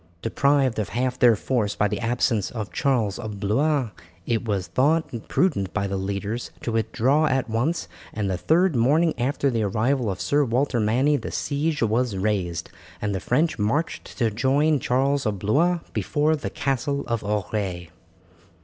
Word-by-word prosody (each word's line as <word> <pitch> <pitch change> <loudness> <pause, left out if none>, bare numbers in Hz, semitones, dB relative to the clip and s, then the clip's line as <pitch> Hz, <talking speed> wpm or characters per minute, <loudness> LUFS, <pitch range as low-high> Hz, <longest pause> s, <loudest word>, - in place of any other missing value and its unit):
Deprived 135 0 +2
of 105 - -2
half 125 +1 -1
their 120 -2 +6
force 105 -2 -1
by 105 - +2
the - - -3
absence 115 -3 0
of 110 -3 -5
Charles 120 -8 0
of 110 -3 -6
Blois, 130 +4 +1 0.3
it 115 -1 0
was 100 -5 -1
thought 145 - +1
prudent 115 - +1
by 100 -1 0
the 100 0 -2
leaders 100 +4 -3
to 120 - -2
withdraw 120 +7 +2
at 130 -1 0
once, 125 +10 -1 0.2
and 105 -2 -2
the 95 - 0
third 165 - +2
morning 150 +8 +3
after 135 +2 +1
the 115 -2 0
arrival 115 +4 0
of 95 -2 -3
Sir 145 +12 +2
Walter 125 0 0
Manny 125 +7 +2
the - - -6
siege 150 0 -1
was 115 -1 +1
raised, 95 -5 -2 0.3
and 105 -1 -2
the 95 - -1
French 150 - 0
marched 115 +11 -2
to 115 -4 +1
join 140 +7 +2
Charles 135 +1 +1
of 105 -2 -1
Blois 160 - +2
before 155 +1 +1
the 145 - -4
Castle 140 +1 -1
of 115 -2 -2
Auray. 100 -4 -2
120 Hz, 165 wpm, -24 LUFS, 105-140 Hz, 0.3 s, their